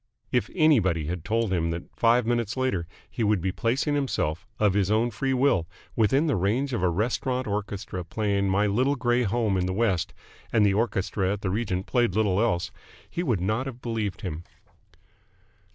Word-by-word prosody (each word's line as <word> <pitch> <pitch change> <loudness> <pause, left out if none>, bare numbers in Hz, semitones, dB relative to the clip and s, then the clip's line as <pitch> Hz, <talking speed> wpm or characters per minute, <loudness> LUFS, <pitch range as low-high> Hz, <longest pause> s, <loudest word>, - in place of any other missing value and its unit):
If 125 - +1
anybody 110 - +3
had 85 +1 -4
told 115 -1 0
him 85 -2 +1
then 85 +1 -3
that - - -28
five 120 +1 +3
minutes 120 0 -1
later 115 -11 0 0.2
he 115 - -3
would 105 -2 +2
be 95 +2 -1
placing 130 - 0
himself 115 - -1
of 105 -3 +3
his 100 -1 +1
own 110 +3 +2
free 130 +5 -1
will 125 -10 +2 0.3
within 135 +7 +3
the 150 - +1
range 115 +9 0
of 120 - -1
a 90 - +3
restaurant 125 +7 -1
orchestra 100 -2 -4
playing 100 +1 0
"My 100 +2 +2
Little 125 +8 +2
Grey 120 -1 +1
Home 110 -3 +1
in 90 0 0
the 95 - -1
West" 100 -6 0 0.4
and 110 -3 +4
the 100 - +3
orchestra 100 -3 0
at 105 - -6
the 95 - -1
Regent 95 -3 -1
played 120 -6 +1
little 105 -2 +2
else 100 -5 0 0.4
he 170 - -4
would 120 - 0
not 110 +8 0
have 125 -2 -7
believed 110 -6 -3
him. 85 -3 -5
105 Hz, 190 wpm, -26 LUFS, 95-120 Hz, 0.4 s, and